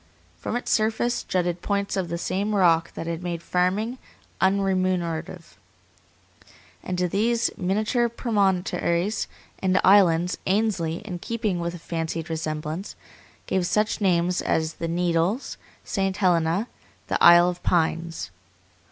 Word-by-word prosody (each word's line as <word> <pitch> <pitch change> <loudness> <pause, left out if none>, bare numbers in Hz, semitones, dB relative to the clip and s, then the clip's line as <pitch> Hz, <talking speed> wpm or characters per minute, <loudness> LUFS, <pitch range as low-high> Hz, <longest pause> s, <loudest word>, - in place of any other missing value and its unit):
From 220 - -3
its 245 - -2
surface 225 +2 +1
jutted 175 -1 -1
points 200 0 -1
of 185 -3 -2
the 170 - -2
same 200 +4 -1
rock 170 -4 +3
that - - -5
had 165 0 -4
made 170 -2 -4
farming 200 +9 0 0.4
unremunerative, 185 -4 0 1.2
and 180 - -4
to 180 0 +1
these 230 +6 +1
miniature 215 +6 0
promontories 195 -4 0 0.3
and 190 0 +2
islands 180 -3 +4
Ainsley, 190 -4 0
in 180 -4 -5
keeping 215 -3 -2
with 170 0 -3
a - - -6
fancied 165 0 -4
resemblance, 155 +3 -4 0.5
gave 185 -2 0
such 210 +3 0
names 180 -2 +2
as 160 0 0
the 165 - -4
Needles, 175 +6 0 0.3
St. 195 -1 -1
Helena, 175 +2 +2 0.4
the - - -1
Isle 175 0 +8
of 180 - -10
Pines. 165 - -1
180 Hz, 125 wpm, -24 LUFS, 170-200 Hz, 1.2 s, Isle